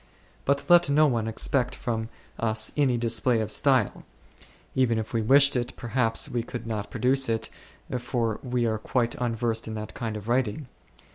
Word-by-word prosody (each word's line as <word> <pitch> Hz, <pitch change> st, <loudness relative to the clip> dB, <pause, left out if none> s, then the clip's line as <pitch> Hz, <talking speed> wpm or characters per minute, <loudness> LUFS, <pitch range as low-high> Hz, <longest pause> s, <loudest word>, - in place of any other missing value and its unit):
But 140 Hz, +1 st, 0 dB
let 175 Hz, -3 st, +6 dB
no 150 Hz, +2 st, +5 dB
one 115 Hz, -6 st, 0 dB
expect 125 Hz, +3 st, 0 dB
from 110 Hz, -2 st, -3 dB, 0.3 s
us 110 Hz, -1 st, 0 dB
any 135 Hz, -5 st, +2 dB
display 115 Hz, +1 st, +1 dB
of 110 Hz, -3 st, -2 dB
style; -, -, +2 dB, 0.7 s
even 125 Hz, -3 st, +2 dB
if 110 Hz, -1 st, -4 dB
we 115 Hz, -, +1 dB
wished 140 Hz, +5 st, +5 dB
it, 125 Hz, 0 st, -2 dB
perhaps 115 Hz, -1 st, 0 dB
we 120 Hz, -, -2 dB
could 120 Hz, +1 st, -7 dB
not 105 Hz, -3 st, -4 dB
produce 130 Hz, 0 st, +2 dB
it, 115 Hz, -1 st, -2 dB, 0.5 s
for 120 Hz, -2 st, -2 dB
we 125 Hz, -2 st, -1 dB
are 110 Hz, -1 st, -1 dB
quite 120 Hz, +1 st, -1 dB
unversed 115 Hz, -1 st, -1 dB
in 110 Hz, -, -5 dB
that 105 Hz, 0 st, -6 dB
kind 110 Hz, -3 st, -4 dB
of 105 Hz, 0 st, -10 dB
writing. 125 Hz, +2 st, 0 dB
120 Hz, 170 wpm, -26 LUFS, 110-130 Hz, 0.7 s, let